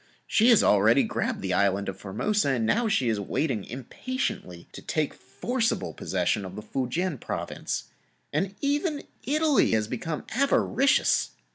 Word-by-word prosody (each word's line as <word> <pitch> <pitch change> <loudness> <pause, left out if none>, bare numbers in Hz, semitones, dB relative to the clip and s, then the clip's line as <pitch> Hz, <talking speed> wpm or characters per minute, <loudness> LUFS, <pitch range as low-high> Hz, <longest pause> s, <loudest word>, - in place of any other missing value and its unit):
She 225 +3 +4
has 230 - +6
already 110 +6 +5
grabbed - - -2
the 95 -1 -1
Island 100 +1 +2
of - - -3
Formosa 140 - -1
and 120 -4 +1
now 230 - +2
she 200 - +1
is 110 -2 +1
waiting 115 +2 -1
impatiently 125 - -5
to - - -10
take 155 -2 -1
forcible 225 - -2
possession 95 +2 -1
of 95 0 -8
the 105 - -7
Foo 125 +3 -3
Kien 170 0 -1
Province. - - -4 0.5
And 190 +6 -1
even 290 +2 0 0.2
Italy 300 - +3
has 110 -1 +1
become 155 +7 -4
avaricious. 275 +2 +2
140 Hz, 150 wpm, -27 LUFS, -, 0.5 s, has